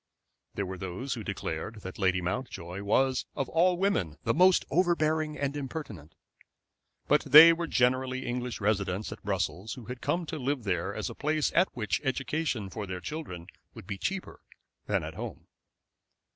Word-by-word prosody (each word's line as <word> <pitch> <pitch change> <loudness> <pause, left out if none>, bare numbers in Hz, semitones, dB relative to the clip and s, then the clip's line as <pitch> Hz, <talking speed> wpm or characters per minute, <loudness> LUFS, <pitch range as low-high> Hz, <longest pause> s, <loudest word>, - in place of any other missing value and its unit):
There 100 - -1
were 95 0 -6
those 95 +9 -4
who 115 -4 -5
declared 100 +2 -4
that 95 +1 -8
Lady 95 -2 +2
Mountjoy 90 -2 -4
was 130 +6 +1
of 135 - -1
all 175 +2 +3
women 135 - 0
the - - +2
most 185 +2 +5
overbearing 155 -2 +1
and 140 0 -2
impertinent. 130 - -6 0.9
But - - +3
they 165 +3 +10
were 170 0 -3
generally 130 0 +1
English 125 0 -3
residents 100 -1 0
at - - -8
Brussels, 100 +4 -2
who 125 - -10
had 125 +2 -7
come 175 0 0
to 160 0 -5
live 135 -1 -1
there 95 -1 -1
as - - -3
a - - -7
place 155 +1 0
at 180 +3 +4
which 105 -6 -1
education 135 -5 -1
for 105 +2 -5
their 95 -1 -4
children 90 - -6 0.3
would - - -10
be 100 0 -5
cheaper 190 - -4 0.5
than - - +1
at - - -6
home. - - -7
125 Hz, 170 wpm, -29 LUFS, 95-155 Hz, 0.9 s, they